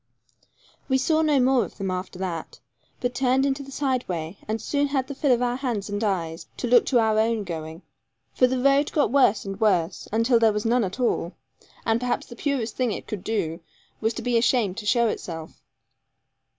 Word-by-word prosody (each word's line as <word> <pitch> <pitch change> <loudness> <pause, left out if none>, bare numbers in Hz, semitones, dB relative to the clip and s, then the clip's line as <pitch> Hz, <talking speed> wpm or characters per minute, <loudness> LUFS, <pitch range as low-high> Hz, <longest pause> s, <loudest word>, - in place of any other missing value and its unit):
We 265 - +4
saw 315 +4 +2
no 300 -3 +3
more 255 -1 +4
of - - -9
them 195 -2 -2
after 185 0 -5
that, 180 -4 -5 0.4
but 245 0 -1
turned 265 +1 +2
into 275 0 0
the 275 0 -10
sideway; 200 - -2
and 220 +1 -1
soon 285 +6 0
had 275 -2 0
the 280 - -5
fill 280 0 +1
of 245 0 +3
our 245 0 0
hands 230 -7 -3
and 205 +2 -2
eyes 170 -5 -2
to - - -3
look 245 +1 +5
to 255 - +3
our 220 -2 +3
own 225 -1 +1
going. 160 -1 -6 0.5
For 255 - +4
the 255 +1 -1
road 275 +2 +3
got 295 - +2
worse 250 -7 +3
and 195 +1 -6
worse, 185 -5 +1
until 230 +2 +3
there 225 -2 +4
was 210 +1 -2
none 240 +1 +3
at 190 +4 -4
all, 215 -7 0 0.5
and 225 0 +2
perhaps 250 0 -1
the 235 - -11
purest 245 -5 -2
thing 250 -3 0
it - - -5
could 210 -4 -6
do 180 -7 -2 0.4
was 220 +1 0
to - - -5
be 245 -2 +2
ashamed 230 -5 +1
to 210 -2 -5
show 235 +1 +3
itself. 165 -6 -6
230 Hz, 205 wpm, -25 LUFS, 195-260 Hz, 0.5 s, look